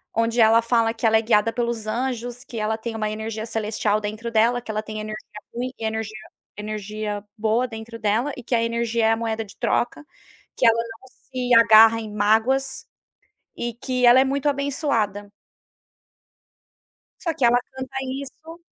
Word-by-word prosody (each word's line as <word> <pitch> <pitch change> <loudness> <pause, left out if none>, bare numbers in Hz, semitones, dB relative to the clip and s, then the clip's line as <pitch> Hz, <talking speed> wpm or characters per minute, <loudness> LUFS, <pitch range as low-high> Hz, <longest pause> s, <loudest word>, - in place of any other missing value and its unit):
onde 230 +1 +1
ela 225 +1 +6
fala 230 -1 +2
que 230 - -4
ela 220 0 +5
é - - +2
guiada 225 0 +2
pelos 235 -3 -2
anjos, 245 +1 -3
que 245 -4 -9
ela 215 +1 -1
tem 225 0 -5
uma 215 -1 -1
energia 220 0 -4
celestial 215 -2 -1
dentro 215 +3 -5
dela, 230 +2 +3
que 230 - -6
ela 215 0 -2
tem 215 0 -6
energia 215 0 -5 0.4
ruim 250 +2 -3
e 225 - -5
energia 220 -1 -3 0.4
energia 210 0 -4
boa 220 +3 +1
dentro 225 0 -8
dela, 230 +6 0
e 250 - -9
que 245 - -4
a 230 - +3
energia 230 0 0
é 220 - +4
a - - +1
moeda 225 -1 -3
de 200 - -15
troca, 245 +5 -1 0.5
que - - +2
ela 230 0 +5
não 230 +2 -6
se 255 -2 -1
agarra 225 0 +7
em 215 -1 -7
mágoas, 225 +6 +1 0.7
e 240 0 -3
que 250 +1 -1
ela 240 +2 +8
é - - +5
muito 275 +1 -1
abençoada. 275 -8 -1 1.9
Só 335 -3 -1
que 265 - +1
ela 240 +1 +5 0.2
canta 260 0 -6 0.2
isso. 320 +4 -11
230 Hz, 175 wpm, -23 LUFS, 220-245 Hz, 1.9 s, ela